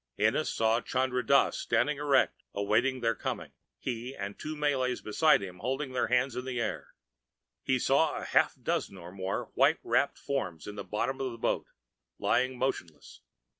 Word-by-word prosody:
Ennis - - +2
saw 115 +1 +2
Chandra 130 -1 0
Dass 140 +4 +3
standing 150 -1 +1
erect, 140 -2 +2
awaiting 115 +6 +1
their 115 -1 +2
coming, - - -4 0.3
he 125 +2 -4
and 100 -3 -5
the - - -33
two 155 0 -4
Malays 135 -4 0
beside 150 +3 +3
him 90 -2 -8
holding 135 +5 -2
their 125 - 0
hands 125 0 +1
in 125 - -3
the 130 -2 -3
air. 115 - -4 0.7
He 130 - +1
saw 140 +5 +2
a - - -5
half - - +3
dozen 95 - -2
or 85 -1 -10
more 95 0 -4
white - - +4
wrapped - - +1
forms 95 - -3
in 105 - -6
the 100 -1 -6
bottom 105 +8 -2
of 130 -1 -1
the 115 - -8
boat, - - -1 0.5
lying 130 +1 +1
motionless. 90 - -4
125 Hz, 175 wpm, -30 LUFS, 105-135 Hz, 0.7 s, white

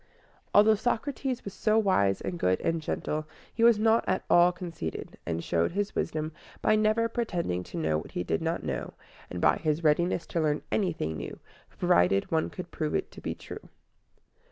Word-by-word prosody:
Although 210 +2 +6
Socrates 250 +3 -2
was 200 - -6
so 215 +2 +2
wise 100 - +2
and 175 - -4
good 90 - +2
and 165 -1 0
gentle, 155 0 -3 0.3
he 230 - 0
was 235 -2 +7
not 225 +1 +3
at 185 - 0
all 175 +1 +7
conceited, 170 - -6
and 85 0 -2
showed 85 - 0
his 205 +1 -1
wisdom 155 -1 -2 0.3
by 215 - +3
never 215 +2 +2
pretending 175 - -2
to - - -8
know 80 -1 +1
what - - -11
he 90 - -2
did 80 -2 -1
not - - -1
know, - - -4 0.3
and 90 - -5
by - - +4
his 155 +1 -1
readiness 165 +3 +2
to 170 - -1
learn 150 -1 0
anything 160 - -1
new, 70 - -6 0.4
provided 90 +3 +3
one 160 -1 +1
could 180 -1 -8
prove 155 -2 -2
it - - -2
to - - -12
be - - -3
true. - - -10
170 Hz, 185 wpm, -28 LUFS, -, 0.4 s, was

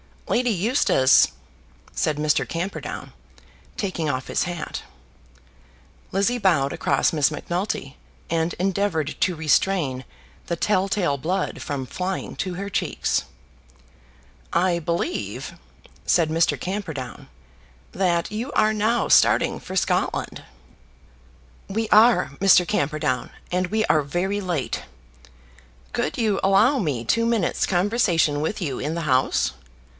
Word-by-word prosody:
"Lady 245 +1 +1
Eustace!" 200 - +4 0.7
said 155 - 0
Mr. 150 0 +1
Camperdown, 175 +4 -5 0.6
taking 175 -6 -2
off 130 -2 -2
his - - 0
hat. 175 -2 -5 1.3
Lizzie 200 +6 +1
bowed 165 - +2
across - - +1
Miss 150 -4 +3
Macnulty, 175 -6 -4 0.3
and 165 +1 0
endeavoured 185 -5 -1
to 185 -2 +1
restrain 155 -3 +1 0.4
the 170 - -1
tell 190 +2 +1
tale 180 -8 0
blood 180 +8 -2
from 140 -2 -4
flying 185 +7 -4
to 185 - -2
her 200 +2 -5
cheeks. - - -1 1.3
"I 175 -1 +2
believe," 170 - -3 0.5
said 165 -3 +3
Mr. 165 +1 +1
Camperdown, 165 - -5 0.6
"that 175 0 0
you 230 +6 -4
are 215 0 +3
now 220 +3 +1
starting - - +4
for - - -8
Scotland." - - -1 1.2
"We 220 +2 -2
are, 220 -8 +5
Mr. 190 -2 +6
Camperdown; 150 -7 -1 0.2
and 180 +1 0
we 220 +3 0
are 155 - +3
very 180 +8 -2
late." 175 -8 -2 1.1
"Could 155 - -2
you 215 -4 +1
allow 215 +8 +4
me 145 - -1
two 230 - +1
minutes' 230 -6 +1
conversation 175 -6 +2
with 180 +7 -2
you 140 -7 -2
in 150 +4 -2
the 170 - -2
house?" 130 - +1
180 Hz, 120 wpm, -23 LUFS, 155-200 Hz, 1.3 s, Mr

